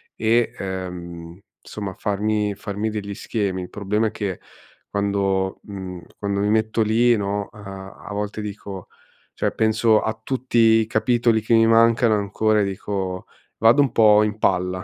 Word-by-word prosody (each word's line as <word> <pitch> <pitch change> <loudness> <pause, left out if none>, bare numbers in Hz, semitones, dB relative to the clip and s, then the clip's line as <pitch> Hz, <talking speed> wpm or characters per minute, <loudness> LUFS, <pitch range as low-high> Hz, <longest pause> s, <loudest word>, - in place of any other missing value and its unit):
e, 115 +1 +2
ehm, 90 -2 -6 0.2
insomma 100 -3 -6
farmi 105 0 -1
farmi 105 +2 -3
degli 105 -2 -5
schemi. 100 -5 -2
Il 90 - -9
problema 105 +2 -1
è - - -4
che 100 -5 -4 0.5
quando 100 -1 0
mhmm, 95 -3 -7 0.2
quando 100 -1 -1
mi 105 - +1
metto 110 +1 +1
lì, 115 +3 +3
no, 100 0 -2
uhm, 105 - -13
a 95 0 -10
volte 105 +1 -3
dico 100 -2 -7 0.5
cioè, - - -1
penso 110 0 +3
a 110 +1 -3
tutti 130 0 -2
i 110 -1 +5
capitoli 115 +1 +2
che 110 +2 0
mi 115 0 +5
mancano 115 0 +4
ancora, 105 +1 +1
e - - +2
dico 95 -1 -4 0.3
vado 115 +6 +5
un 135 - +1
po' 105 -2 +5
in 105 0 -2
palla, 90 -1 0
105 Hz, 160 wpm, -22 LUFS, 95-110 Hz, 0.5 s, i